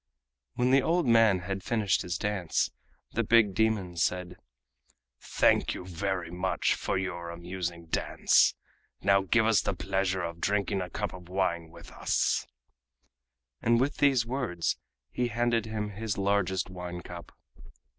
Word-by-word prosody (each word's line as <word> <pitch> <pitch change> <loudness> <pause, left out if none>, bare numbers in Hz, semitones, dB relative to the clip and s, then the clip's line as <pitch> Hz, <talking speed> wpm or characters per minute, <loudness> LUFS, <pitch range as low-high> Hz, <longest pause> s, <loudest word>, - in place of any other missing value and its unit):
When 125 +1 +2
the 135 +1 +6
old 170 +4 +1
man 115 -6 +5
had 95 +1 -4
finished 105 -3 +1
his 90 -1 -3
dance, 100 -5 -1 0.4
the - - 0
big 110 -4 +4
demon 105 -5 0
said: 90 +1 -1 0.8
"Thank - - +2
you 90 - -7
very 90 -1 -3
much 90 +1 0
for - - -2
your 85 -2 -4
amusing 85 0 -5
dance. 80 - +3 0.5
Now 100 0 +4
give 110 +4 +2
us 110 -2 +4
the - - -2
pleasure 95 -1 -1
of 85 0 -5
drinking 100 -1 0
a 90 - -5
cup 105 +2 -4
of 90 -1 -11
wine 90 -3 -1
with - - -13
us," - - 0 1.1
and 115 0 +3
with 135 +3 0
these 135 -5 +3
words 115 -10 -1 0.4
he 125 - 0
handed 120 -1 0
him 105 -1 -3
his 105 0 -3
largest 100 -2 +1
wine 90 -1 -6
cup. 85 0 -10
95 Hz, 145 wpm, -29 LUFS, 90-110 Hz, 1.1 s, the